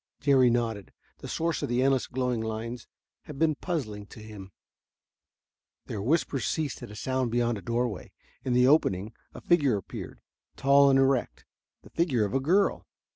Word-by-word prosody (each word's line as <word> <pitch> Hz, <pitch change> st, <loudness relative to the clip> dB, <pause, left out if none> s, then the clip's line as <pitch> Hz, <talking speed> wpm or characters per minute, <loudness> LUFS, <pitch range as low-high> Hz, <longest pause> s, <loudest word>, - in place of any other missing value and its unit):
Jerry 135 Hz, -3 st, +4 dB
nodded; 115 Hz, -4 st, -2 dB, 0.3 s
the -, -, -8 dB
source 165 Hz, -3 st, -1 dB
of -, -, -3 dB
the 120 Hz, +1 st, +1 dB
endless 135 Hz, -1 st, +2 dB
glowing 125 Hz, -2 st, -1 dB
lines 110 Hz, +2 st, -5 dB, 0.4 s
had 150 Hz, -, -9 dB
been 160 Hz, +1 st, +2 dB
puzzling 115 Hz, -, -4 dB
to -, -, -13 dB
him. 105 Hz, -3 st, -10 dB, 1.3 s
Their 105 Hz, -, -5 dB
whispers 135 Hz, +1 st, 0 dB
ceased 150 Hz, -4 st, -2 dB
at -, -, -8 dB
a 105 Hz, -, -10 dB
sound 130 Hz, +2 st, -1 dB
beyond 120 Hz, -1 st, 0 dB
a -, -, -12 dB
doorway. 120 Hz, +3 st, -2 dB, 0.3 s
In 130 Hz, -, -1 dB
the 125 Hz, +1 st, +4 dB
opening 110 Hz, -8 st, +2 dB, 0.2 s
a -, -, -9 dB
figure 145 Hz, -10 st, +3 dB
appeared, 95 Hz, -, -8 dB, 0.4 s
tall 140 Hz, +1 st, +5 dB
and 135 Hz, -, +4 dB
erect, 135 Hz, -2 st, +1 dB, 0.4 s
the -, -, -16 dB
figure 135 Hz, -11 st, +1 dB
of 100 Hz, -, -5 dB
a 135 Hz, -, +2 dB
girl. 185 Hz, +9 st, +1 dB
125 Hz, 170 wpm, -28 LUFS, 110-140 Hz, 1.3 s, tall